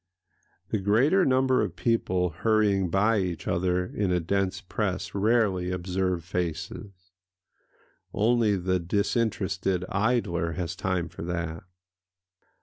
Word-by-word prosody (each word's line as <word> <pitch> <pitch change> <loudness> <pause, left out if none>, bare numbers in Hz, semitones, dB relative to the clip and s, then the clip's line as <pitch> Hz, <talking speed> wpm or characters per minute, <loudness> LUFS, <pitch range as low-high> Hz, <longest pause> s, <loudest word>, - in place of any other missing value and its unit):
The 110 - 0
greater 125 - +3
number 130 0 +3
of - - -2
people 95 -7 0
hurrying 100 +1 +2
by 105 +5 +2
each 90 -3 -3
other 90 +1 +1
in 95 0 -2
a 90 - +2
dense 95 +2 -1
press 95 -1 -3
rarely 100 -3 +2
observe 90 -1 -1
faces: 90 +2 -5 1.0
only 110 -1 +2
the 95 0 0
disinterested 95 -1 0
idler 95 -6 0
has 85 -1 -4
time 90 -4 -1
for - - -10
that. 85 -1 -4
95 Hz, 115 wpm, -27 LUFS, 90-105 Hz, 1.0 s, greater